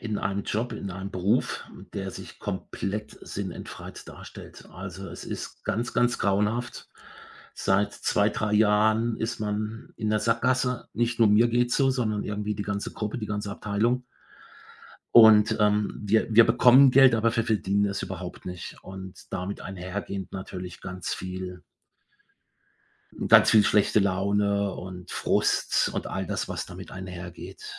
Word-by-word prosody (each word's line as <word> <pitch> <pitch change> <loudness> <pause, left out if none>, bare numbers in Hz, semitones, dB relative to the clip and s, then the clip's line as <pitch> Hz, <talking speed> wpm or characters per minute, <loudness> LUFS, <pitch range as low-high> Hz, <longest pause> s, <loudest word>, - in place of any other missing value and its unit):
in 110 -3 -3
einem 100 +1 -2
Job 115 +5 -2
in 100 -2 -5
einem 95 +2 -6
Beruf, 100 +7 0 0.3
der 95 -1 -4
sich - - -10
komplett 105 +2 -5
sinnentfreit - - -7
darstellt. - - -12
Also, 95 +1 -8
es - - -9
ist - - -7
ganz, 115 +4 -2
ganz 120 0 +2
grauenhaft. 105 +5 -1 0.7
Seit 100 +2 +1
2, 105 +1 +1
3 105 0 -1
Jahren 110 +2 +3
ist 115 +1 -3
man 105 +1 -4
in 110 - -2
'ner 105 0 +2
Sackgasse. 125 +2 0
Nicht 120 0 0
nur 115 -2 +6
mir 110 +3 +5
geht's 120 +1 +1
so, 135 -1 +3
sondern 110 -5 -1
irgendwie 105 0 -3
die 105 - -4
ganze 100 0 -3
Gruppe, 105 +1 -4
die 110 - -4
ganze 105 -1 -3
Abteilung. 110 +5 -1 1.1
Und, 110 -2 +8
ähm, 105 -1 +1
wir 110 +2 +2
wir 115 - +9
bekommen 125 +3 +6
Geld, 130 -1 +7
aber 115 +1 +1
wir 115 - +2
verdienen 100 -3 +1
es 100 0 -3
überhaupt - - -7
nicht 90 -1 -7
und 95 -1 -10
damit 90 +3 -4
einhergehend 95 +1 -6
natürlich 90 -2 -7
ganz 95 -1 -4
viel 90 0 -6 1.6
ganz - - +7
viel 110 -2 +6
schlechte 105 0 +3
Laune 100 +1 +1
und 90 0 -9
Frust - - +1
und - - -3
all - - -3
das, - - -3
was - - -4
damit - - -10
einhergeht. 90 - -9
105 Hz, 150 wpm, -26 LUFS, 95-115 Hz, 1.6 s, wir